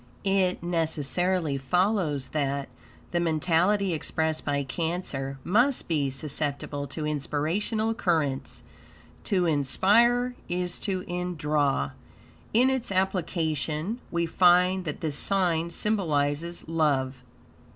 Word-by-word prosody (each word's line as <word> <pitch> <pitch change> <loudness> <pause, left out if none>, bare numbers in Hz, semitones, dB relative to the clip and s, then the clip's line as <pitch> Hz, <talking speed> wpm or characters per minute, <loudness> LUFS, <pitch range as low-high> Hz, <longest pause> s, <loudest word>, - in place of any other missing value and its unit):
It 190 -3 +1
necessarily 165 -1 0
follows 165 -2 0
that, 140 -2 -2 0.4
the 175 - +1
mentality 175 +4 +2
expressed 160 0 -1
by 145 -1 0
Cancer 140 -2 -3
must 245 +8 +2
be 150 -5 +1
susceptible 145 +1 -2
to 150 +3 -4
inspirational 160 - -1
currents; 160 - -1 0.6
to 185 -4 +1
inspire 220 - +3 0.2
is 180 0 -1
to 190 -3 -2
indraw. 150 - -1 0.6
In 250 +4 +4
its 255 -4 -2
application, 170 - -1
we 170 0 0
find 180 +2 +4
that 150 - -5
this 150 -3 0
sign 175 -4 +1
symbolizes 170 -5 -1
love. 140 -5 0
165 Hz, 100 wpm, -27 LUFS, 145-185 Hz, 0.6 s, In